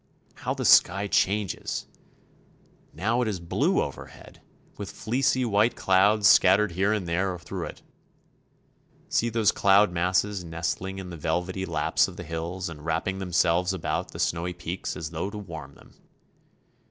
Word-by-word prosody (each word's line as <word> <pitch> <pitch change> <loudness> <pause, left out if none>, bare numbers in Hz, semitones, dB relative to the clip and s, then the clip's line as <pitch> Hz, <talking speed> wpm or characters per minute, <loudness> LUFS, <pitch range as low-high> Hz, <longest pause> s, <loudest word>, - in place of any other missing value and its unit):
How - - -4
the - - -3
sky 95 +3 +5
changes! 100 -1 -1 1.1
Now 115 +8 0
it 120 - 0
is 100 -4 -2
blue 85 0 +1
overhead, - - -10 0.3
with - - -7
fleecy 130 +2 0
white 110 +2 +2
clouds 100 +3 +3
scattered 100 0 +5
here 95 +4 +1
and 105 -5 -1
there 90 +2 -1
through - - -6
it. - - -10 1.3
See 120 - +1
those 115 -2 +2
cloud 100 0 +4
masses 90 +3 0
nestling 85 +3 -4
in 95 -2 -7
the 85 - -7
velvety 90 +5 -2
laps 80 -3 +1
of - - -11
the - - -6
hills 85 +3 -4
and 75 -3 -9
wrapping 85 +4 -2
themselves 90 0 +1
about 95 - -3
the - - -10
snowy 85 +1 -1
peaks 90 +1 -5
as 80 -1 -5
though 85 +4 -3
to 105 - -8
warm 80 -8 -9
them. - - -19
95 Hz, 155 wpm, -26 LUFS, 85-100 Hz, 1.3 s, sky